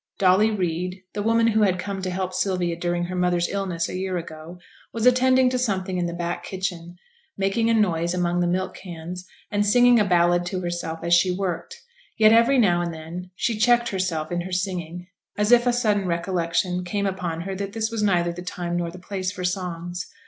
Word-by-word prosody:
Dolly 190 Hz, +3 st, +4 dB
Reid, 180 Hz, -2 st, -2 dB
the 205 Hz, -, -3 dB
woman 230 Hz, +2 st, +3 dB
who 220 Hz, -1 st, +2 dB
had 190 Hz, -3 st, +3 dB
come 195 Hz, +1 st, -4 dB
to 185 Hz, -, -2 dB
help 185 Hz, 0 st, -3 dB
Sylvia 185 Hz, -2 st, 0 dB
during 175 Hz, 0 st, -1 dB
her 180 Hz, +1 st, -4 dB
mother's 180 Hz, -1 st, +1 dB
illness 185 Hz, -4 st, -2 dB
a -, -, -6 dB
year 185 Hz, 0 st, -2 dB
ago, 165 Hz, +1 st, -8 dB, 0.3 s
was 230 Hz, 0 st, -2 dB
attending 255 Hz, +1 st, +5 dB
to 255 Hz, -, 0 dB
something 190 Hz, -6 st, -1 dB
in 175 Hz, -, 0 dB
the 170 Hz, -, -4 dB
back 175 Hz, 0 st, -3 dB
kitchen, 180 Hz, -3 st, -5 dB, 0.4 s
making 195 Hz, +4 st, +1 dB
a 230 Hz, -, +3 dB
noise 175 Hz, -6 st, +1 dB
among 175 Hz, -1 st, 0 dB
the 175 Hz, -, +1 dB
milk 185 Hz, +2 st, -1 dB
cans, 180 Hz, 0 st, -8 dB, 0.2 s
and 205 Hz, 0 st, +1 dB
singing 245 Hz, +3 st, +5 dB
a -, -, +4 dB
ballad 175 Hz, -2 st, +3 dB
to 185 Hz, 0 st, -3 dB
herself 175 Hz, -2 st, -4 dB
as 170 Hz, 0 st, +1 dB
she 175 Hz, +2 st, +5 dB
worked; 195 Hz, -, -4 dB, 0.3 s
yet 220 Hz, -1 st, +6 dB
every 235 Hz, +4 st, +5 dB
now 175 Hz, -8 st, +3 dB
and 170 Hz, -1 st, -2 dB
then 165 Hz, +3 st, -8 dB
she 225 Hz, +1 st, -1 dB
checked 240 Hz, +1 st, +3 dB
herself 175 Hz, -5 st, -2 dB
in 175 Hz, 0 st, -1 dB
her 185 Hz, +2 st, -7 dB
singing, 180 Hz, -2 st, -3 dB, 0.3 s
as 210 Hz, +2 st, +1 dB
if 240 Hz, 0 st, +6 dB
a -, -, +5 dB
sudden 210 Hz, -5 st, +1 dB
recollection 175 Hz, +1 st, -1 dB
came 200 Hz, +3 st, -2 dB
upon 180 Hz, -4 st, -3 dB
her 195 Hz, +2 st, -4 dB
that 200 Hz, +1 st, -5 dB
this 220 Hz, 0 st, -2 dB
was 225 Hz, -2 st, -2 dB
neither 175 Hz, -4 st, +2 dB
the 175 Hz, -, -7 dB
time 175 Hz, -1 st, -4 dB
nor 170 Hz, -1 st, -2 dB
the 175 Hz, -, -10 dB
place 185 Hz, 0 st, -4 dB
for 185 Hz, -2 st, -7 dB
songs. 180 Hz, -1 st, -3 dB
185 Hz, 210 wpm, -24 LUFS, 175-205 Hz, 0.4 s, yet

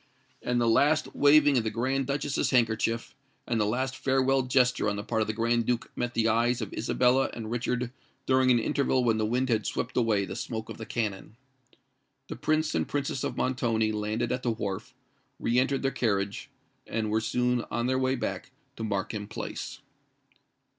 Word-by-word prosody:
And 125 Hz, 0 st, 0 dB
the 120 Hz, -, +2 dB
last 145 Hz, +7 st, +3 dB
waving 145 Hz, -2 st, +5 dB
of -, -, -2 dB
the 110 Hz, -, 0 dB
Grand 130 Hz, +4 st, -1 dB
Duchess's 140 Hz, 0 st, 0 dB
handkerchief, 115 Hz, -2 st, +1 dB, 0.3 s
and 115 Hz, -2 st, 0 dB
the 105 Hz, -, +2 dB
last 130 Hz, +4 st, -1 dB
farewell 135 Hz, 0 st, +2 dB
gesture 125 Hz, -3 st, +2 dB
on 100 Hz, -, -2 dB
the 100 Hz, -, -4 dB
part 110 Hz, +1 st, -1 dB
of 110 Hz, -, 0 dB
the -, -, 0 dB
Grand 115 Hz, +1 st, +1 dB
Duke 120 Hz, -1 st, -1 dB
met 120 Hz, 0 st, -3 dB
the 115 Hz, -1 st, +2 dB
eyes 120 Hz, +2 st, +2 dB
of 110 Hz, -4 st, -5 dB
Isabella 125 Hz, +3 st, +2 dB
and 110 Hz, -1 st, -6 dB
Richard 125 Hz, 0 st, -1 dB, 0.3 s
during 130 Hz, 0 st, +3 dB
an 125 Hz, -, +6 dB
interval 130 Hz, +2 st, +1 dB
when 115 Hz, -2 st, +2 dB
the 110 Hz, -, +1 dB
wind 125 Hz, +3 st, 0 dB
had 110 Hz, -3 st, +1 dB
swept -, -, -3 dB
away 110 Hz, -5 st, +2 dB
the -, -, -6 dB
smoke 110 Hz, -2 st, -5 dB
of -, -, -8 dB
the 110 Hz, -, -7 dB
cannon. 105 Hz, -2 st, -3 dB, 0.9 s
The -, -, -4 dB
Prince 155 Hz, 0 st, 0 dB
and 80 Hz, -1 st, 0 dB
Princess 140 Hz, -1 st, -2 dB
of -, -, -3 dB
Montoni 115 Hz, -4 st, +1 dB
landed 110 Hz, +2 st, -2 dB
at 125 Hz, 0 st, -1 dB
the 125 Hz, -, -1 dB
wharf, 110 Hz, +3 st, -4 dB, 0.4 s
re 120 Hz, +2 st, +2 dB
entered 135 Hz, +1 st, 0 dB
their 135 Hz, -, +1 dB
carriage, 100 Hz, -5 st, -1 dB, 0.4 s
and 110 Hz, -1 st, -2 dB
were 110 Hz, +1 st, +2 dB
soon 125 Hz, +1 st, +1 dB
on 120 Hz, +1 st, -1 dB
their 130 Hz, +1 st, +1 dB
way 130 Hz, 0 st, +1 dB
back 120 Hz, -4 st, -4 dB, 0.3 s
to 110 Hz, -, -4 dB
Markham 105 Hz, 0 st, -3 dB
Place. 110 Hz, -, -6 dB
120 Hz, 190 wpm, -28 LUFS, 110-130 Hz, 0.9 s, an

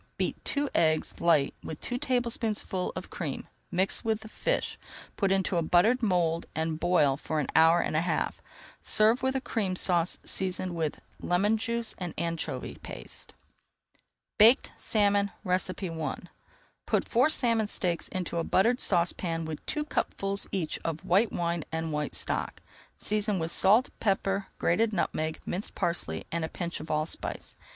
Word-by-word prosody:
Beat -, -, -2 dB
two 285 Hz, 0 st, +1 dB
eggs 155 Hz, -1 st, +1 dB
light 160 Hz, -5 st, +3 dB
with 155 Hz, -, -6 dB
two 245 Hz, 0 st, -3 dB
tablespoonfuls 230 Hz, -7 st, -1 dB
of -, -, -7 dB
cream, -, -, -4 dB, 0.2 s
mix 185 Hz, +2 st, 0 dB
with 220 Hz, -1 st, 0 dB
the 220 Hz, -, -9 dB
fish, -, -, -1 dB, 0.4 s
put 195 Hz, -2 st, +1 dB
into 190 Hz, -2 st, +1 dB
a -, -, +3 dB
buttered 195 Hz, +10 st, +3 dB
mould 175 Hz, -6 st, +1 dB
and 160 Hz, 0 st, -1 dB
boil 170 Hz, -6 st, +3 dB
for 155 Hz, +1 st, -2 dB
an 150 Hz, -, 0 dB
hour 165 Hz, +2 st, +6 dB
and -, -, -2 dB
a 155 Hz, -, +3 dB
half. 170 Hz, -1 st, -1 dB, 0.4 s
Serve 220 Hz, +4 st, +4 dB
with 265 Hz, 0 st, 0 dB
a -, -, +2 dB
Cream 200 Hz, -7 st, -1 dB
Sauce 175 Hz, -1 st, +2 dB
seasoned 185 Hz, -1 st, -1 dB
with 160 Hz, -3 st, -1 dB
[Page -, -, -23 dB, 0.2 s
270] -, -, -7 dB
lemon 195 Hz, +5 st, +3 dB
juice 230 Hz, +1 st, -2 dB
and 175 Hz, -3 st, -4 dB
anchovy 170 Hz, 0 st, -3 dB
paste. -, -, -9 dB, 1.0 s
BAKED 230 Hz, +6 st, +6 dB
SALMON 205 Hz, -2 st, +2 dB
I 180 Hz, -4 st, -1 dB, 0.7 s
Put -, -, +1 dB
four 250 Hz, +5 st, +4 dB
salmon 230 Hz, -7 st, +3 dB
steaks 175 Hz, -4 st, -1 dB
into 180 Hz, -2 st, -4 dB
a 165 Hz, -, +1 dB
buttered 235 Hz, +9 st, +3 dB
saucepan 170 Hz, -2 st, +1 dB
with 155 Hz, -1 st, -6 dB
two 300 Hz, -1 st, -1 dB
cupfuls 200 Hz, -8 st, -1 dB
each 175 Hz, -6 st, -2 dB
of 165 Hz, -1 st, -3 dB
white 200 Hz, +6 st, +3 dB
wine 170 Hz, -1 st, -1 dB
and 160 Hz, -1 st, -2 dB
white 150 Hz, -1 st, -2 dB
stock. -, -, -2 dB, 0.4 s
Season 210 Hz, -1 st, 0 dB
with 165 Hz, -1 st, -2 dB
salt, 215 Hz, +9 st, +4 dB
pepper, 195 Hz, -1 st, 0 dB
grated 220 Hz, +5 st, +2 dB
nutmeg, 160 Hz, -3 st, -1 dB
minced 190 Hz, +4 st, -4 dB
parsley, 80 Hz, -, -1 dB
and 170 Hz, 0 st, -1 dB
a 160 Hz, -, -2 dB
pinch 170 Hz, -1 st, -4 dB
of 155 Hz, +2 st, -8 dB
allspice. 155 Hz, +1 st, -3 dB
180 Hz, 160 wpm, -29 LUFS, 165-215 Hz, 1.0 s, hour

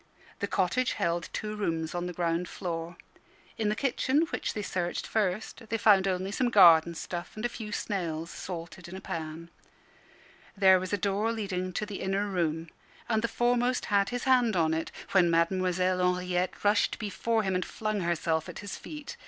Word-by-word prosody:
The 200 Hz, -, -1 dB
cottage 195 Hz, +7 st, +1 dB
held 170 Hz, 0 st, -1 dB
two 215 Hz, 0 st, -4 dB
rooms 165 Hz, -6 st, -2 dB
on 175 Hz, 0 st, -2 dB
the -, -, -4 dB
ground 170 Hz, 0 st, -1 dB
floor. 170 Hz, -1 st, -5 dB, 0.6 s
In 215 Hz, -2 st, +1 dB
the 210 Hz, -, 0 dB
kitchen, 265 Hz, +4 st, +1 dB
which -, -, -2 dB
they 210 Hz, -, -2 dB
searched 175 Hz, -2 st, -2 dB
first, 215 Hz, +2 st, -2 dB
they 225 Hz, -, 0 dB
found 200 Hz, -3 st, +5 dB
only 190 Hz, +1 st, -1 dB
some 250 Hz, +3 st, +1 dB
garden 170 Hz, -6 st, +7 dB
stuff 175 Hz, +1 st, -5 dB
and 215 Hz, +2 st, -4 dB
a -, -, +1 dB
few 220 Hz, -3 st, -7 dB
snails 170 Hz, -6 st, -3 dB
salted 170 Hz, 0 st, -7 dB
in 180 Hz, -, -8 dB
a -, -, -6 dB
pan. 165 Hz, -2 st, -6 dB, 1.1 s
There 190 Hz, -1 st, +6 dB
was 185 Hz, 0 st, -5 dB
a 205 Hz, -, +1 dB
door 200 Hz, +3 st, 0 dB
leading 190 Hz, -5 st, -3 dB
to 210 Hz, -, -2 dB
the 205 Hz, -2 st, -6 dB
inner 195 Hz, +2 st, 0 dB
room, 165 Hz, -4 st, -1 dB, 0.4 s
and 220 Hz, -2 st, +1 dB
the 235 Hz, -, +1 dB
foremost 245 Hz, +1 st, +1 dB
had 200 Hz, -1 st, +4 dB
his 245 Hz, 0 st, -3 dB
hand 245 Hz, -5 st, +3 dB
on 160 Hz, -2 st, +2 dB
it, 160 Hz, +1 st, -2 dB, 0.2 s
when 180 Hz, -3 st, +5 dB
Mademoiselle 180 Hz, +2 st, +2 dB, 0.2 s
Henriette 180 Hz, 0 st, -2 dB
rushed 205 Hz, +1 st, +3 dB
before 220 Hz, +2 st, -1 dB
him, 190 Hz, -1 st, 0 dB
and 185 Hz, 0 st, 0 dB
flung 215 Hz, -1 st, -3 dB
herself 170 Hz, -1 st, 0 dB
at 180 Hz, -, -8 dB
his 205 Hz, -1 st, -6 dB
feet. 300 Hz, -1 st, -8 dB
190 Hz, 185 wpm, -29 LUFS, 175-215 Hz, 1.1 s, garden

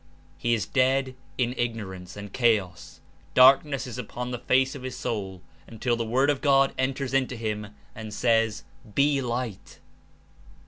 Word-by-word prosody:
He 120 Hz, +9 st, +1 dB
Is 110 Hz, -, -2 dB
dead 130 Hz, 0 st, +1 dB, 0.2 s
In 125 Hz, -1 st, 0 dB
Ignorance 100 Hz, -6 st, -4 dB
and 100 Hz, -1 st, -8 dB
chaos; 105 Hz, -, 0 dB, 0.3 s
darkness 135 Hz, +2 st, +6 dB
Is 125 Hz, -1 st, -7 dB
upon 125 Hz, +1 st, -5 dB
the 125 Hz, -, -4 dB
face 130 Hz, +2 st, +2 dB
of 140 Hz, -, -8 dB
his 130 Hz, 0 st, -6 dB
soul, 95 Hz, -7 st, -4 dB, 0.2 s
until 120 Hz, +2 st, -1 dB
the 115 Hz, -, -2 dB
Word 130 Hz, +6 st, +2 dB
of 140 Hz, -, -3 dB
God 135 Hz, -2 st, +4 dB
enters 130 Hz, 0 st, -2 dB
Into 130 Hz, -2 st, +1 dB
him 105 Hz, -2 st, -3 dB, 0.3 s
and 110 Hz, -1 st, -8 dB
says: 115 Hz, -1 st, +1 dB, 0.3 s
"Be 140 Hz, 0 st, +3 dB
light!" 120 Hz, -4 st, -4 dB
120 Hz, 150 wpm, -26 LUFS, 110-130 Hz, 0.3 s, darkness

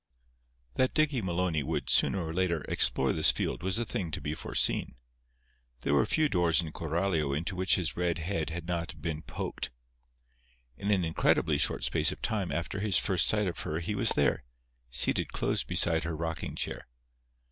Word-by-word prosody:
That 130 Hz, 0 st, +1 dB
Dicky 150 Hz, -5 st, +1 dB
Maloney 90 Hz, -4 st, -1 dB
would, 65 Hz, -, -3 dB
sooner 95 Hz, -4 st, +3 dB
or 80 Hz, -, -5 dB
later, 85 Hz, -3 st, 0 dB
explore -, -, +2 dB
this -, -, +10 dB
field -, -, -3 dB
was 95 Hz, +2 st, -1 dB
a 120 Hz, -, -1 dB
thing 90 Hz, -5 st, -4 dB
to 80 Hz, -, -4 dB
be 75 Hz, -, -4 dB
foreseen. 80 Hz, -, -1 dB, 0.9 s
There 70 Hz, -, -1 dB
were 70 Hz, -, +3 dB
few 155 Hz, -1 st, +2 dB
doors 90 Hz, -, +2 dB
in 80 Hz, -3 st, -3 dB
Coralio 80 Hz, -3 st, -1 dB
into 85 Hz, +4 st, -3 dB
which 95 Hz, +1 st, +2 dB
his 90 Hz, -4 st, -2 dB
red 85 Hz, -1 st, -1 dB
head 80 Hz, -1 st, -3 dB
had 85 Hz, 0 st, -6 dB
not 85 Hz, -1 st, -4 dB
been 80 Hz, 0 st, -4 dB
poked. -, -, -5 dB, 1.1 s
In 100 Hz, -, -4 dB
an 95 Hz, -4 st, +2 dB
incredibly 80 Hz, -, +1 dB
short -, -, +1 dB
space -, -, +1 dB
of -, -, -8 dB
time 100 Hz, -5 st, -2 dB
after 85 Hz, +4 st, -3 dB
his 100 Hz, -2 st, +2 dB
first 95 Hz, -4 st, +3 dB
sight 105 Hz, -1 st, +2 dB
of 90 Hz, -, -4 dB
her 75 Hz, -, -3 dB
he 85 Hz, +5 st, -3 dB
was -, -, +2 dB
there, -, -, +1 dB, 0.5 s
seated 60 Hz, -, 0 dB
close -, -, 0 dB
beside 80 Hz, -1 st, +1 dB
her 80 Hz, -1 st, -4 dB
rocking 80 Hz, 0 st, -4 dB
chair. -, -, -4 dB
85 Hz, 180 wpm, -29 LUFS, 80-95 Hz, 1.1 s, this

